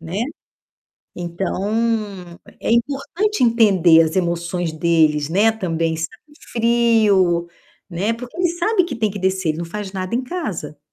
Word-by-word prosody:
né. 165 +3 -6 1.0
Então 180 +3 -3 0.9
é - - -2
importante 285 - 0
entender 195 -9 +5
as 160 -1 0
emoções 170 -1 -1
deles, 155 -2 +2
né, 205 +6 +3
também 165 -6 -2
sentem 220 - -7 0.2
frio, 220 -7 +3 0.4
né. 195 +6 -1
Porque 245 +1 -9
ele 355 -1 +2
sabe 365 +4 +1
que 345 - -5
tem 220 -3 0
que 200 - -6
descer, 190 -2 0
ele 155 - -1
não 170 - -3
faz 195 +3 -6
nada 185 +2 -3
em 255 - -1
casa. 215 - -5
190 Hz, 145 wpm, -20 LUFS, 170-235 Hz, 1.0 s, entender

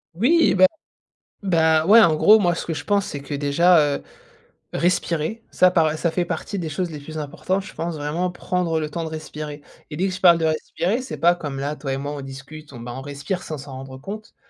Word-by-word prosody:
Oui, 315 - +4
bah 185 0 +7 0.8
bah, 160 -4 +3
ouais. 225 +3 +8
En 160 -6 +5
gros, 215 +7 +6
moi, 175 -3 +2
ce - - -5
que 165 - -2
je 145 0 -6
pense, 200 -2 +2
c'est 145 - -5
que, 145 +1 -7
déjà, 155 +5 +4 0.2
heu, - - -14 0.7
respirer 175 +4 0
ça 185 0 +4
par 160 -3 +2
ça 170 +1 0
fait 175 +1 0
partie 180 +3 -4
des 165 - -3
choses 175 +3 -3
les 150 - -7
plus 155 +2 -9
importantes. 185 +6 -2
Je 190 - -11
pense 165 -1 -4
vraiment 155 +5 -2
prendre 175 -2 -1
le 155 - -2
temps 165 +2 -3
de 160 - -4
respirer. 150 -2 -7 0.3
Et 150 - -7
dès 190 +3 +1
que 185 - -3
je 185 - -7
parle 170 -2 +7
de 165 - 0
respirer, 175 +8 -1
c'est 260 - -7
pas 175 +1 +4
comme 145 -5 -6
là, 145 +2 -2
toi 135 -2 -4
et - - -2
moi, 145 +1 -4
on 145 - -6
discute, 140 +2 -10
on, 120 - -9
bah, 120 +1 -7
on 135 - -6
respire 145 +6 -4
sans 155 - -6
s'en 140 0 -10
rendre 130 0 -8
compte. 205 +10 -9
160 Hz, 240 wpm, -22 LUFS, 145-180 Hz, 0.8 s, ouais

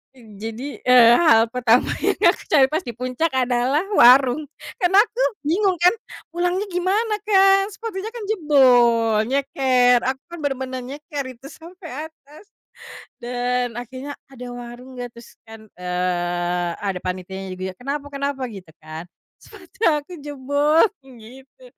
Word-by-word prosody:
Jadi, 225 +3 -8
eee, 240 -2 +7
hal 225 -9 +5
pertama 245 -1 +2
yang - - +1 0.2
aku - - -11
cari 280 -4 +5
pas 315 - 0
dipuncak 255 +5 -3
adalah 255 +5 +1
warung, 260 +3 +5 0.3
kan 360 -4 +2
aku 425 +6 +3 0.2
bingung 375 +4 +1
kan, 355 +4 +4 0.4
pulangnya 355 +2 0
gimana 400 +5 0
Kak, 390 0 +4
sepatunya 440 -2 -5
kan 470 -2 -8
jebol, 245 - +3
nyeker 255 -2 +2
aku 265 0 -2
kan 345 - -7
benar-benar 265 -2 -3
nyeker 290 +3 -6
itu 260 +1 -12
sampai 325 -3 -9
atas. 305 +4 -19 0.7
Dan 245 0 -2
akhirnya 255 +4 -7 0.2
ada 250 -2 -10
warung 245 +2 -10
gak 245 -1 -6
terus 235 - -16
kan, 220 -1 -13
eee, 175 -1 -2
ada 195 -3 -3
panitianya 185 +1 -5
juga, 185 0 -4
"Kenapa 280 +6 -5
kenapa?" 280 -1 -4
Gitu 190 -7 -11
kan, 155 +1 -8 0.4
"Sepatu 385 -4 -17
aku 300 +3 -3
jebol," 290 +3 +2 0.2
gitu. 265 - -16
260 Hz, 130 wpm, -21 LUFS, 235-315 Hz, 0.7 s, eee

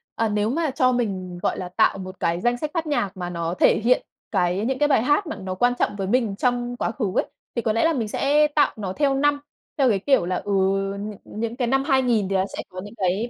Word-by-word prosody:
Ờ, 225 -1 0
nếu 210 +1 0
mà 315 +1 0
cho 255 -2 +2
mình, 190 -7 -2
gọi - - 0
là, 180 -1 -5
tạo 185 - +2
một 185 -1 -8
cái 170 0 0
danh 240 +2 +1
sách 300 +3 -4
phát 330 -2 -2
nhạc 205 -10 -1
mà 175 -1 -4
nó 170 -1 -3
thể - - +5
hiện 250 +2 +3 0.3
cái 185 +1 +1
những 265 +2 -1
cái 295 - +4
bài 270 -6 +3
hát 295 +8 +2
mà 315 - -4
nó 185 -1 -4
quan 245 +5 +2
trọng - - +1
với 195 -2 -3
mình 225 -3 +1
trong 245 +1 -1
quá - - -1
khứ 230 -1 -3
ấy, - - +2 0.3
thì 235 - 0
có 220 -2 0
lẽ 230 - +2
là 330 - +3
mình 230 -6 -1
sẽ 295 +7 +3
tạo 295 0 +2
nó 190 -3 -4
theo 285 -2 +1
năm, 290 +1 +2 0.4
theo 270 -3 +4
cái 200 -4 +2
kiểu 265 -4 +2
là, 180 +1 -1
ừ, 205 - -4 0.5
nh 210 +1 -5
những 230 +2 -4
cái 245 -2 -1
năm 270 +2 +2
2000 250 -8 +2
thì 195 - 0
nó 190 0 +2
sẽ - - -4
có 185 0 -7
những 205 +3 -11
cái 195 +5 0
230 Hz, 265 wpm, -23 LUFS, 190-270 Hz, 0.5 s, thể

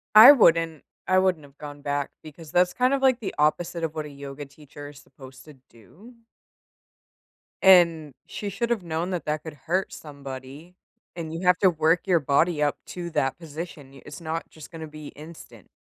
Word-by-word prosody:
I 225 +6 +12
wouldn't 165 - +3 0.2
I 185 - +3
wouldn't 185 -5 +1
have 140 0 -18
gone 145 -1 -9
back 145 -1 -2
because 155 0 -12
that's 180 0 +3
kind 255 +1 +2
of 275 - 0
like 260 -2 +3
the 215 - -5
opposite 165 +3 0
of 160 -2 -2
what 155 -1 -4
a - - -8
yoga 140 0 -9
teacher 145 +1 -13
is 145 -1 -14
supposed 130 -2 -15
to 150 -2 -14
do. 175 - -17 1.5
And 170 -6 +5
she 205 - -5
should’ve 235 0 -2
known 170 +2 -3
that 175 -5 -3
that 150 0 -2
could 160 - -8
hurt 170 +7 -2
somebody, 140 +3 -10 0.4
and 165 -2 -6
you 175 +2 -4
have 180 0 +5
to 190 - +5
work 160 +1 +2
your 180 -3 +3
body 150 +3 +1
up 145 -1 +1
to 175 -1 -6
that 135 -4 -1
position. 155 -3 -9
Y 135 - -14
it's - - -9
not 165 0 -5
just 155 -2 -13
gonna 160 -2 -8
be 155 -1 -10
instant. 155 +3 -13
160 Hz, 190 wpm, -25 LUFS, 145-180 Hz, 1.5 s, I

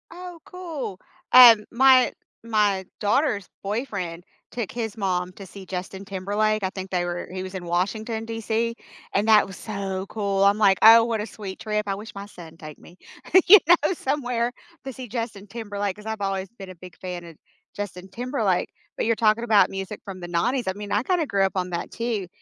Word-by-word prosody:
Oh, 355 0 -10
cool. 320 - -6 0.3
Um, 235 -4 +9
my 260 +1 +5 0.3
my 210 -4 +1
daughter's 210 -2 +1 0.2
boyfriend 195 -6 -4 0.3
took 230 -5 -4
his 225 -3 -4
mom 180 -3 -1
to 195 - -11
see 190 +1 -11
Justin 185 +1 -6
Timberlake. 205 +2 -1
I 190 - -1
think 190 0 -6
they 180 -1 -1
were 175 0 -4
he 185 0 -5
was 185 0 -8
in 180 -2 -6
Washington 215 +6 -2
D.C, 225 +1 -2 0.4
and 205 +2 +1
that 215 -2 +6
was 190 -1 -10
so 195 -3 -4
cool. 200 -2 0
I'm 200 +1 +4
like, 200 -3 +4
"Oh, 225 +1 +9
what 225 -2 -1
a - - -3
sweet 195 -2 -8
trip." 210 -1 -2
I 195 - -1
wish 215 +3 -9
my 200 0 -6
son 170 -5 -13
take 155 -2 -11
me, 175 - -17 0.5
you 415 +3 +10
know, 340 0 +4
somewhere 250 -6 -1 0.3
to 265 - -4
see 255 0 -8
Justin 225 -3 -5
Timberlake 205 -2 -4
'cause 210 - -14
I've 220 -1 -4
always 195 -1 -2
been 195 -1 -9
a 185 - -10
big 180 0 -13
fan 180 -2 -6
of 165 -1 -12 0.4
Justin 190 -2 -6
Timberlake, 225 -4 -1 0.3
but - - -1
you're 230 +1 +2
talking 220 +1 +2
about 215 -3 +5
music 195 +2 -6
from 195 -2 -8
the 175 - -7
90s. 230 +9 0
I 190 - 0
mean, 205 +1 -8
I 210 - +1
kinda 355 +1 +1
grew 200 -7 +1
up 190 - 0
on 180 -1 -1
that 170 0 -4
too. 230 -5 -3
205 Hz, 200 wpm, -24 LUFS, 190-230 Hz, 0.5 s, you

